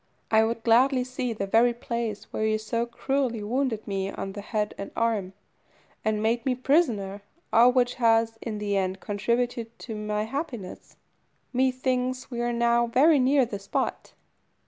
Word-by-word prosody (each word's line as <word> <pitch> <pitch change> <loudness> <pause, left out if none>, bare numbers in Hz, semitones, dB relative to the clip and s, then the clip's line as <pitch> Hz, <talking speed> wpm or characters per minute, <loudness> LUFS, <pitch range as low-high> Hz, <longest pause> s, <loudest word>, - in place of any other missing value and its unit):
I 220 0 +5
would 225 0 -2
gladly 250 +3 +4
see 255 -1 -3
the 210 -3 -3
very 230 +4 +3
place 235 -3 -4
where - - -1
you 215 0 +2
so 230 +2 -2
cruelly 240 -2 -1
wounded 235 0 -1
me 195 -1 -2
on 195 0 -5
the 205 - -6
head 210 0 -2
and 200 - -6
arm, 215 -5 0 0.7
and 215 -1 0
made 230 +2 +1
me 260 -2 +1
prisoner, 235 - +1 0.3
all 240 +2 +7
which 245 -1 +2
has, 225 -1 +3
in 220 -3 -4
the 205 -1 -1
end 190 -1 -1
contributed 235 +3 -2
to 230 - -7
my 210 0 -2
happiness. 240 - -6 0.6
Methinks 255 0 0
we 240 -1 -3
are 240 0 0
now 235 0 +2
very 280 +6 +5
near 265 +1 +4
the 205 -4 -6
spot." 195 - -3
235 Hz, 165 wpm, -26 LUFS, 210-250 Hz, 0.7 s, all